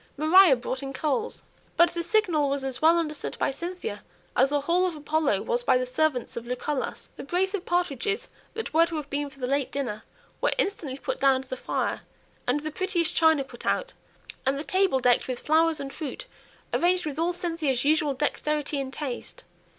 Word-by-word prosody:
Maria 320 +1 +7
brought 255 +2 -4
in 270 0 -5
coals. 315 - -2 0.3
But 340 0 +6
the 340 - -2
signal 335 -7 +2
was 275 0 -1
as 265 -2 -3
well 325 +2 +6
understood 305 -3 -3
by - - +1
Cynthia 340 - -5 0.3
as 265 +2 +4
the 290 0 +1
"Hall 350 +5 +2
of 345 - -4
Apollo" 305 0 0
was 485 0 0
by 255 - +4
the 255 - -1
servants 255 0 0
of 235 0 -6
Lucullus. 255 +2 -3
The - - -6
brace 365 +6 0
of 385 -3 -4
partridges 360 - 0 0.3
that 450 - -4
were 330 +1 +5
to 335 - -5
have 300 -2 -5
been 285 0 -1
for 275 - -18
the 255 - -2
late 275 +1 0
dinner 240 -7 -3 0.4
were - - +2
instantly 310 -10 -1
put - - -4
down 265 -1 +3
to - - -23
the 260 - -4
fire; - - -2 0.5
and 270 +4 +1
the 310 +1 -4
prettiest 350 -1 0
china 320 -3 +5
brought 265 - -10
out, - - 0 0.5
and 270 +1 +1
the 285 - -4
table 375 -6 +2
decked 245 -1 +3
with 255 -1 -2
flowers 320 +1 +3
and 275 -1 -6
fruit, 300 -5 -6 0.5
arranged 360 0 +2
with 300 0 -4
all 335 +2 +2
Cynthia's 330 -7 -1
usual 300 -2 +2
dexterity 295 +1 -1
and 265 -1 -5
taste. 290 - -6
300 Hz, 200 wpm, -26 LUFS, 270-345 Hz, 0.5 s, Maria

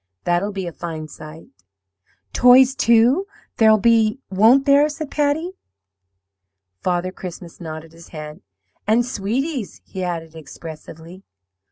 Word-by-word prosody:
That'll 175 +4 0
be 195 -2 -5
a 170 - -5
fine 160 -2 -6
sight!' 155 +2 -12 0.8
"'Toys, 250 +1 +6
too, 245 - +3 0.3
there'll 220 -1 +6
be, 220 +1 +3
won't 225 +8 +5
there?' 285 +1 +5
said 300 -1 -7
Patty. 300 +4 0 1.3
"Father 180 0 -1
Christmas 180 -2 -10
nodded 160 -1 -8
his 165 0 -15
head. 155 -1 -9 0.5
'And 230 +3 +3
sweeties,' 250 - -3
he 185 - -6
added, 165 -2 -4
expressively. 160 +3 -11
195 Hz, 120 wpm, -20 LUFS, 165-250 Hz, 1.3 s, Toys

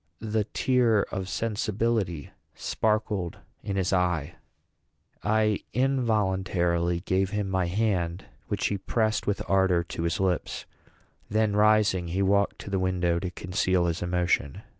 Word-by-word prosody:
The 110 -1 -1
tear 120 -3 +2
of 95 0 -4
sensibility 110 - -1 0.2
sparkled 105 -5 -1 0.2
in 100 - -3
his 95 -1 0
eye. 90 -3 +1 0.9
I 105 0 +2
involuntarily 95 -9 +1
gave 95 0 +1
him 105 -1 -2
my 95 -2 0
hand, 90 -3 -1 0.2
which - - -2
he 100 - -2
pressed 110 +2 0
with 100 - -1
ardor 95 -3 +3
to 85 - -6
his 85 +1 -1
lips; 95 -3 -1 0.6
then, 110 -1 +1
rising, 105 -4 +3
he 95 +4 0
walked 100 +1 +2
to 100 - -8
the 95 - +1
window 90 -2 +1
to 90 - -3
conceal 90 0 0
his 85 0 -1
emotion. 90 -5 0
95 Hz, 135 wpm, -27 LUFS, 90-105 Hz, 0.9 s, ardor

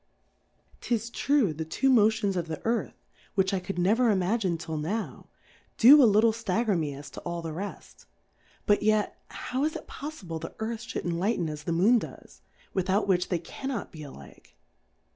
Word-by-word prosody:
'Tis 230 -1 -2
true, 270 - +2
the 160 +2 -4
two 160 - -1
Motions 215 -5 +3
of 170 -2 -2
the 160 -2 -5
Earth, 230 +1 -2 0.3
(which 190 -1 +2
I 195 - +1
could 180 +1 -6
never 220 +7 +3
Imagine 190 -2 +1
till 160 -1 -5
now 195 +9 -4 0.2
) - - -32
do 280 +6 +9
a - - +8
lit 210 +1 +4
tle 230 0 +4
ftagger 220 -1 0
me 150 -4 -2
as 140 -1 -10
to - - -8
all 170 -1 -5
the 160 -1 -4
reft; 200 +5 -8 0.6
but 205 - +3
yet, 215 0 +1
how 260 +2 -4
is 310 +1 0
it - - -7
poffible 190 - -7
the 165 - -7
Earth 220 +1 -3
fl^ould - - -4
enlighten 175 +2 0
as 150 0 -8
the - - -1
Moon 200 +9 +4
does, - - -11 0.3
without 190 +2 +1
which 180 -2 +1
they 180 - +1
cannot 230 +8 -5
be 155 - -10
alike 70 - -13
195 Hz, 185 wpm, -28 LUFS, 170-225 Hz, 0.6 s, do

